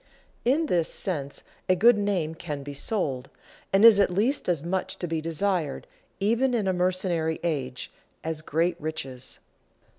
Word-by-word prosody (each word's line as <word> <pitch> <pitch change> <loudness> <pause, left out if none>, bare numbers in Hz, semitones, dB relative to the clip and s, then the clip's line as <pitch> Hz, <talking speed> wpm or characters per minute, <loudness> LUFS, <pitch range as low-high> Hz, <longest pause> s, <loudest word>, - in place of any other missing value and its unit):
In 285 +7 +2
this 175 - +1
sense 145 -7 -3 0.3
a 185 - +5
good 230 +6 +6
name 195 -6 0
can 150 -4 -6
be 145 +1 -7
sold, 140 - -2 0.4
and 195 +3 +5
is 220 -3 +9
at 200 - +4
least 215 +7 0
as 165 -5 0
much 185 +2 -2
to - - -4
be 165 -2 -2
desired, 165 -1 -1 0.3
even 235 +6 +2
in 210 -4 0
a 190 - +2
mercenary 180 -3 0
age, 135 -7 -3 0.3
as 160 -1 -3
great 165 +2 0
riches. 130 -5 -5
175 Hz, 155 wpm, -26 LUFS, 155-200 Hz, 0.4 s, is